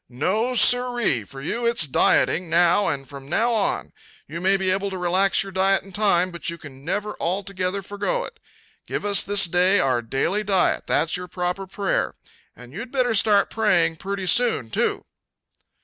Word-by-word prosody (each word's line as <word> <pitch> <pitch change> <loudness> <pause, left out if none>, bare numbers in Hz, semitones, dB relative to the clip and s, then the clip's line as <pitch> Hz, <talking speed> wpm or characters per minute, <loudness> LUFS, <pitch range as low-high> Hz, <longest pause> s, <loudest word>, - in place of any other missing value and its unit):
"No, 210 - -1
sir 245 +1 +4
ree! 170 - 0
For 135 +6 -11
you 235 +9 -2
it's 235 -8 +3
dieting, 165 +5 +2
now 175 +4 +3
and 135 -1 -3
from 140 -1 -11
now 235 +8 +1
on. 210 -3 -1 0.3
You 165 +3 -7
may 195 +2 +3
be 190 -1 0
able 195 +1 -1
to 190 - -6
relax 185 +3 +2
your 195 - -9
diet 195 +1 +2
in 195 - -14
time, 185 -2 +2
but 170 0 -5
you 170 - -6
can 135 -4 -13
never 205 +6 -3
altogether 190 +1 -2
forego 210 - -2
it. 470 -2 -9 0.5
Give - - -4
us 200 -2 +4
this 205 -1 +3
day 180 +3 +3
our 130 -5 +1
daily 135 - -1
diet 195 -2 +1
that's 165 +2 +1
your 180 0 -7
proper 180 +2 -3
prayer. 195 0 -2 0.4
And 125 +1 -14
you'd 235 +8 -7
better 255 -3 +1
start 205 -1 +3
praying 175 -7 +1
pretty 195 +2 -5
soon, 225 - +2
too!" - - -1
190 Hz, 180 wpm, -22 LUFS, 170-205 Hz, 0.5 s, sir